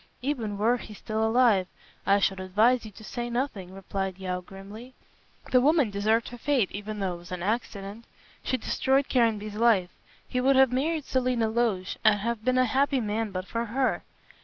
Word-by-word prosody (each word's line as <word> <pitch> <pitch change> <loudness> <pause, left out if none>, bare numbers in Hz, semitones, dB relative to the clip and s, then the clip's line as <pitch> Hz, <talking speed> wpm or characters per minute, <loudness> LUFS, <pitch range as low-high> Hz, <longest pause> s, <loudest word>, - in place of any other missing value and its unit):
"Even 235 -7 -2
were 230 +4 +2
he 215 -3 -10
still 220 +2 -3
alive, 220 -5 +3 0.4
I 200 - +5
should 195 -1 +1
advise 220 +7 +2
you - - -7
to 215 - -13
say 240 +2 -4
nothing," 235 -7 -3
replied 195 -1 -4
Yeo, 185 -1 -3
grimly; 200 +7 -11 0.6
"the 255 - +5
woman 290 -4 +3
deserved 215 +3 +1
her 245 - -10
fate, 260 -7 +1
even 210 +1 -6
though 190 -2 -1
it - - -7
was 175 +1 -14
an 180 -1 -4
accident. 210 0 -3 0.4
She 260 - -1
destroyed 265 +3 +1
Caranby's 220 -4 +1
life. 210 -5 +3 0.4
He 250 - -1
would 270 +2 +4
have 265 -1 +5
married 300 +4 -1
Selina 250 -3 0
Loach 220 -5 -1
and 215 -2 +5
have 230 +1 -3
been 255 +1 +2
a 255 - +4
happy 270 +3 +1
man 220 0 -2
but 185 -1 -5
for 230 +3 -3
her." 255 +4 0
220 Hz, 185 wpm, -27 LUFS, 200-250 Hz, 0.6 s, I